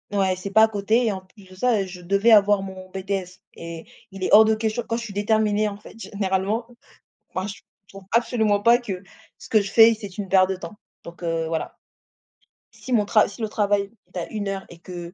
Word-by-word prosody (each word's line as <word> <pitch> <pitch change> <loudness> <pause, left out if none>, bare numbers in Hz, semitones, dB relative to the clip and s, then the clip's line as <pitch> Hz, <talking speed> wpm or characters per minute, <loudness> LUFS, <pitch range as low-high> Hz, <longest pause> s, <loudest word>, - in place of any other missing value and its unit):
ouais, 190 -2 +2
c'est 195 +2 -6
pas 220 +2 +6
à 220 - +6
côté 220 +3 +1
et - - +2
en 190 -1 -5
plus 190 +1 -20
de 185 - -14
ça, 225 0 +1
heu, - - -2
je 180 0 -10
devais 200 +6 +2
avoir 205 -2 +5
mon 190 -1 -9
BTS 190 -1 -4 0.2
et 165 -1 -8 0.3
il 195 -1 -8
est - - 0
hors 220 +1 +9
de 220 0 +3
question 220 +2 -2
quand 230 - -1
je 235 - -5
suis 210 - -8
déterminée, 210 +1 +1
en 200 - -5
fait, 210 - -15
généralement. 200 +2 -2 0.7
Ben, 185 +2 -2
je 205 - -8 0.3
trouve 195 -1 -13
absolument 220 -3 +2
pas 235 +2 +6
que 205 -7 -6 0.4
ce - - -12
que 215 - +5
je 195 0 -6
fais, 225 0 +7
c'est 200 -2 -9
une 195 -3 -4
perte 190 -1 +4
de 190 - -1
temps 175 +2 -9 0.3
donc, 170 +1 -11
heu, 165 -1 -1
voilà. 160 -1 -4 1.0
Si 260 - -10
mon 210 -3 +3
tra 215 +1 +4
si 205 +3 -11
le 215 - -2
travail 205 -1 0 0.2
est - - -4
à 170 - -3
1 210 -2 -3
heure 195 -1 -4
et 170 - -13
que 175 -1 -9
200 Hz, 235 wpm, -23 LUFS, 185-220 Hz, 1.0 s, hors